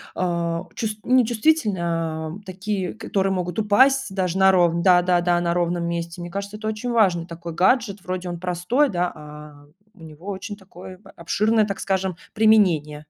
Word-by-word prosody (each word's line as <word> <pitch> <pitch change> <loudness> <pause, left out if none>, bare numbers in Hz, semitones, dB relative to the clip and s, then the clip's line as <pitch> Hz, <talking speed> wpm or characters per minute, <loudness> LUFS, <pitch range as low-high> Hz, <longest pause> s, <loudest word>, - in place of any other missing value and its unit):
э, 170 -2 -1 0.2
чув 220 - -2
не 255 0 +4
чувствительные, 220 - +1
а 160 -2 -2
такие, 190 0 -4
которые 195 -3 -1
могут 180 +1 -3
упасть 260 +2 +3
даже 185 -2 -1
на 190 0 +6
ров 175 -3 +3
да-да-да, 175 -1 +3
на 170 0 0
ровном 175 0 -1
месте. 170 0 -4
Мне 175 - -6
кажется, 200 +1 -5
это 215 0 -6
очень 220 +3 -3
важный 185 -7 +2
такой 170 -1 -8
гаджет, 200 +2 +1
вроде 185 -1 -4
он 175 - -5
простой, 185 +11 0
да, 180 -3 -1
а 150 -1 -12 0.3
у 175 -6 -17
него 160 +4 -12
очень 200 +2 -5
такое, 185 -1 -12
а, - - -16
обширное, 215 +5 +2
так 200 -2 -5
скажем, 190 -2 -1 0.2
применение. 185 -9 +3
185 Hz, 170 wpm, -22 LUFS, 170-210 Hz, 0.3 s, на